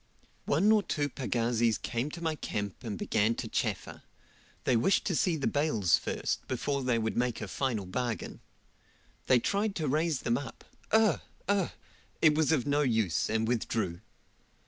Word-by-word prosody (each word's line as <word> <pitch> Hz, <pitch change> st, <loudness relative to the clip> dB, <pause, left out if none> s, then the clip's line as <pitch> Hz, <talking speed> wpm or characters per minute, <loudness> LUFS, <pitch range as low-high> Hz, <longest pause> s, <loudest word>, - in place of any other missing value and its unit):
One 190 Hz, +9 st, +4 dB
or 215 Hz, -1 st, +5 dB
two 145 Hz, -7 st, -1 dB
pagazis 120 Hz, -3 st, 0 dB
came 120 Hz, +5 st, -2 dB
to 170 Hz, +2 st, -8 dB
my 160 Hz, -1 st, +1 dB
camp 105 Hz, -8 st, -4 dB
and 110 Hz, -4 st, -4 dB
began 110 Hz, +5 st, +1 dB
to -, -, -4 dB
chaffer; -, -, -2 dB, 0.6 s
they 125 Hz, -, +2 dB
wished 120 Hz, +12 st, +3 dB
to 180 Hz, -, 0 dB
see 175 Hz, +1 st, +2 dB
the 145 Hz, -, -3 dB
bales 115 Hz, -, +2 dB
first, -, -, -3 dB
before 140 Hz, +2 st, -1 dB
they 125 Hz, -2 st, +1 dB
would 110 Hz, -1 st, -1 dB
make 120 Hz, -1 st, 0 dB
a 105 Hz, -, -5 dB
final 115 Hz, -1 st, -2 dB
bargain. 115 Hz, +2 st, -3 dB, 0.9 s
They 130 Hz, -, +6 dB
tried 200 Hz, -, 0 dB
to 155 Hz, -3 st, -1 dB
raise 155 Hz, +1 st, +1 dB
them 120 Hz, +2 st, +1 dB
up 140 Hz, -, -9 dB, 0.3 s
ugh! 220 Hz, -1 st, +4 dB, 0.3 s
ugh! 200 Hz, -3 st, +1 dB, 0.5 s
it 155 Hz, -2 st, +5 dB
was 155 Hz, 0 st, +2 dB
of 140 Hz, -7 st, +2 dB
no 145 Hz, +1 st, +2 dB
use, 110 Hz, -, +1 dB
and 110 Hz, 0 st, +1 dB
withdrew. 110 Hz, -6 st, -1 dB
125 Hz, 170 wpm, -30 LUFS, 110-155 Hz, 0.9 s, They